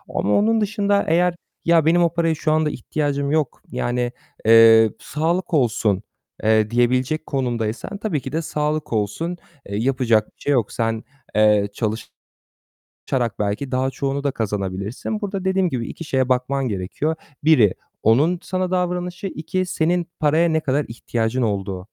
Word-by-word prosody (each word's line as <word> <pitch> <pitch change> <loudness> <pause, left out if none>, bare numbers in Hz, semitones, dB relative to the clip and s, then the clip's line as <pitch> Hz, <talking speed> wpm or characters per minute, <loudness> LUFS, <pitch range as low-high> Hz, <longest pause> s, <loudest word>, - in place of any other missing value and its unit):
ama 105 - +1
onun 220 +2 +3
dışında 205 -1 +1
eğer 175 +2 +2 0.3
"Ya, 165 -2 +4
benim 175 +2 +4
o 170 -1 +1
paraya 165 -1 +1
şu 155 0 -1
anda 155 0 +2
ihtiyacım 140 +1 -2
yok. 155 -4 0
Yani, 120 0 -1 0.3
eee, 115 -1 +7
sağlık 170 +4 -2
olsun." 110 -7 +1 0.4
eee, 110 -1 +3
diyebilecek 125 +6 +1
konumdaysan 120 - -2
tabii 195 -9 -2
ki - - -7
de 160 - -1
sağlık 150 -3 -2
olsun. 110 - -2 0.3
Eee, 100 - -3
yapacak 120 -3 +2
bir - - -35
şey 145 - +1
yok. 120 -6 +1
Sen, 115 -1 -1 0.3
eee, 105 -1 +4
çalışarak 110 0 -5 1.1
belki 105 +6 -2
daha 130 +1 +1
çoğunu 140 +1 -3
da 140 - +2
kazanabilirsin. 105 - -3
Burada 195 -2 -4
dediğim 190 -1 +2
gibi 120 -3 -3
2 165 - -8
şeye 130 -4 0
bakman 130 +1 0
gerekiyor: 105 - -2 0.3
Biri 125 - +5 0.3
onun 145 +11 +3
sana 185 0 -2
davranışı, 180 +1 -2
2 185 +2 -3
senin 175 0 0
paraya 155 +3 +3
ne 160 0 +1
kadar 145 -1 0
ihtiyacın 115 +1 -2
olduğu. 95 -4 -2
140 Hz, 150 wpm, -21 LUFS, 115-170 Hz, 1.1 s, eee